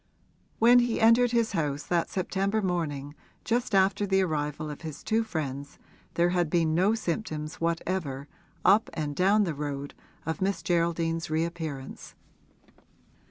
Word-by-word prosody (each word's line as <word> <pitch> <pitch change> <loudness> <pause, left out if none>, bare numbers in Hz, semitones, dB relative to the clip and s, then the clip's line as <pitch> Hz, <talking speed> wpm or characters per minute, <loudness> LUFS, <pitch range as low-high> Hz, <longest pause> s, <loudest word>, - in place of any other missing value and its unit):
When 240 +2 +6
he 240 -1 0
entered 230 +2 +5
his 235 -2 +1
house 145 -5 -1
that 170 -1 0
September 195 +3 -1
morning 145 -6 -2 0.3
just 235 -1 0
after 195 +2 +3
the 190 0 +3
arrival 150 -2 -2
of 145 - -9
his 155 -3 -7
two 225 +1 +1
friends 145 -8 -5 0.4
there 170 +1 +3
had 175 -2 +1
been 165 -2 +2
no 190 +7 +3
symptoms 165 -6 -4
whatever, 165 -4 -2 0.4
up 205 +4 +5
and 150 -2 -3
down 200 +5 +4
the 170 -5 -1
road, 145 -1 -5 0.3
of 160 +5 -3
Miss 190 -3 -1
Geraldine's 165 -1 0
reappearance. 160 -4 -4
170 Hz, 140 wpm, -28 LUFS, 155-195 Hz, 0.4 s, When